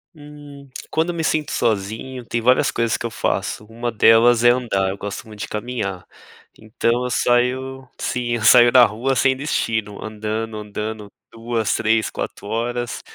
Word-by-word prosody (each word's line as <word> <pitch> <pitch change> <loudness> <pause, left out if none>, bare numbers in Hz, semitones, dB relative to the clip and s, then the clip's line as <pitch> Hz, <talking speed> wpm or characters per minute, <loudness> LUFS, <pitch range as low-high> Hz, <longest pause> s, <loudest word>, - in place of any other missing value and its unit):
Hum. 145 -2 -13 0.2
Quando 160 +2 0
eu 175 - -3
me 165 - -2
sinto 155 -2 0
sozinho, 115 +4 -2
tem 115 0 -2
várias 125 +3 +3
coisas 115 -1 0
que - - -6
eu - - -1
faço. 105 -1 -2
Uma 120 +2 -4
delas 115 +2 +5
é 120 - +7
andar, 110 -6 0
eu 100 - -5
gosto 100 +4 -6
muito 105 -1 -12
de - - -4
caminhar. 105 -5 -4 0.5
Então, 115 +3 -1
eu - - -2
saio 130 +2 0
sim. 120 -1 -2
Eu 115 - -4
saio 120 +2 +7
na 125 -1 +8
rua 120 +5 -1
sem 130 +1 +3
destino, 110 -7 -2
andando, 110 +1 -4
andando 105 0 -6 0.3
2, 115 -2 -2
3, 110 0 +1
4 - - -6
horas. 120 +2 -3
115 Hz, 170 wpm, -21 LUFS, 110-125 Hz, 0.5 s, na